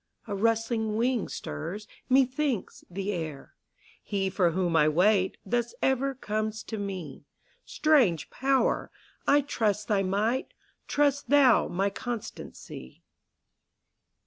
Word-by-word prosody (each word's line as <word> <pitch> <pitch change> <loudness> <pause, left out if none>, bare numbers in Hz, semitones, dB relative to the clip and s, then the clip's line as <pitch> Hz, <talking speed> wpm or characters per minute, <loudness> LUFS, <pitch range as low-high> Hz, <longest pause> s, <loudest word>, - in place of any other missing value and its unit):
a 205 - -5
rustling 225 +1 0
wing 240 0 +1
stirs, 180 - -6 0.2
methinks, 260 -2 +1
the 195 +3 -3
air: 160 -7 -5 0.5
He 195 -2 -2
for 180 -2 +3
whom 175 0 0
I 155 -1 +5
wait, 190 +4 +3
thus 235 +3 -1
ever 265 +1 +1
comes 215 -2 -3
to 220 - -5
me; 190 -8 -6 0.4
Strange 250 - +2
Power! 270 0 +1 0.4
I 290 +1 +5
trust 215 -7 -1
thy 205 -2 +3
might; 210 +7 -1 0.3
trust 285 -1 +1
thou 275 -4 +5
my 195 +3 0
constancy. 225 - -7
215 Hz, 115 wpm, -28 LUFS, 190-255 Hz, 0.5 s, I